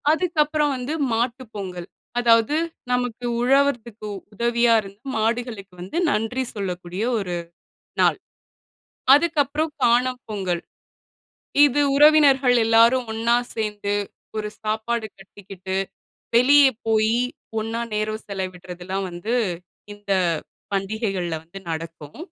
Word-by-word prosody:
அதுக்கப்பறம் 305 Hz, -3 st, +1 dB
வந்து 255 Hz, +4 st, -4 dB, 0.2 s
மாட்டு 240 Hz, +3 st, -1 dB
பொங்கல். 180 Hz, -3 st, -6 dB, 0.3 s
அதாவது 230 Hz, +3 st, +4 dB, 0.4 s
நமக்கு 245 Hz, -1 st, -1 dB, 0.2 s
உழவர்தக்கு 245 Hz, -4 st, +1 dB, 0.3 s
உதவியா 235 Hz, +2 st, +2 dB
இருந்த 200 Hz, 0 st, -13 dB, 0.2 s
மாடுகளுக்கு 220 Hz, -3 st, -2 dB
வந்து 185 Hz, -, -5 dB
நன்றி 245 Hz, +1 st, 0 dB
சொல்லக்கூடிய 180 Hz, -1 st, -4 dB, 0.2 s
ஒரு 180 Hz, -3 st, -3 dB, 0.7 s
நாள். -, -, +4 dB, 1.0 s
அதுக்கப்பறம் 300 Hz, 0 st, +1 dB
காணும் 250 Hz, +2 st, +2 dB
பொங்கல். 185 Hz, -5 st, -2 dB, 1.0 s
இது 290 Hz, 0 st, +3 dB, 0.2 s
உறவினர்கள் 280 Hz, -4 st, +6 dB
எல்லாரும் 230 Hz, +3 st, +4 dB
ஒண்ணா 230 Hz, +2 st, +2 dB, 0.2 s
சேர்ந்து 210 Hz, -2 st, -2 dB, 0.4 s
ஒரு 210 Hz, 0 st, -2 dB
சாப்பாடு 220 Hz, +1 st, -1 dB
கட்டிக்கிட்டு 190 Hz, -1 st, -7 dB, 0.6 s
வெளிய 280 Hz, +4 st, +7 dB, 0.2 s
போயி, 220 Hz, +1 st, +2 dB, 0.4 s
ஒண்ணா 225 Hz, +1 st, -3 dB
நேரம் 215 Hz, +1 st, -2 dB
செலவிடுறதெல்லாம் 185 Hz, 0 st, -5 dB
வந்து 175 Hz, +7 st, -3 dB, 0.6 s
இந்த 205 Hz, -1 st, -4 dB, 0.6 s
பண்டிகைகள்ல 195 Hz, -3 st, -2 dB
வந்து 170 Hz, +4 st, -10 dB
நடக்கும். 160 Hz, -2 st, -7 dB
225 Hz, 95 wpm, -23 LUFS, 195-250 Hz, 1.0 s, வெளிய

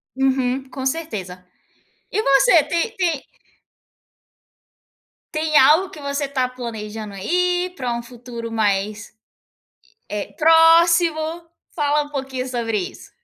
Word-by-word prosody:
Uhum, 265 Hz, 0 st, 0 dB
com 265 Hz, 0 st, -6 dB
certeza. 210 Hz, -, -4 dB, 0.7 s
E 430 Hz, -, +1 dB
você 290 Hz, -, +5 dB
tem 340 Hz, +9 st, -2 dB
tem 335 Hz, -7 st, -1 dB, 2.1 s
tem 310 Hz, 0 st, +1 dB
algo 315 Hz, +7 st, +5 dB
que 300 Hz, -, -11 dB
você 280 Hz, 0 st, -2 dB
tá 260 Hz, -2 st, 0 dB
planejando 220 Hz, -4 st, -7 dB
aí, 360 Hz, -, 0 dB
pra 250 Hz, -3 st, -2 dB
um 235 Hz, -, -5 dB
futuro 235 Hz, -1 st, -8 dB
mais, 210 Hz, -1 st, -1 dB, 1.0 s
eh, 205 Hz, -1 st, -5 dB
próximo? 330 Hz, 0 st, +4 dB, 0.3 s
Fala 295 Hz, -2 st, +1 dB
um 290 Hz, -, -9 dB
pouquinho 265 Hz, -2 st, -4 dB
sobre 235 Hz, -3 st, -2 dB
isso. 185 Hz, -, -7 dB
270 Hz, 115 wpm, -21 LUFS, 235-325 Hz, 2.1 s, você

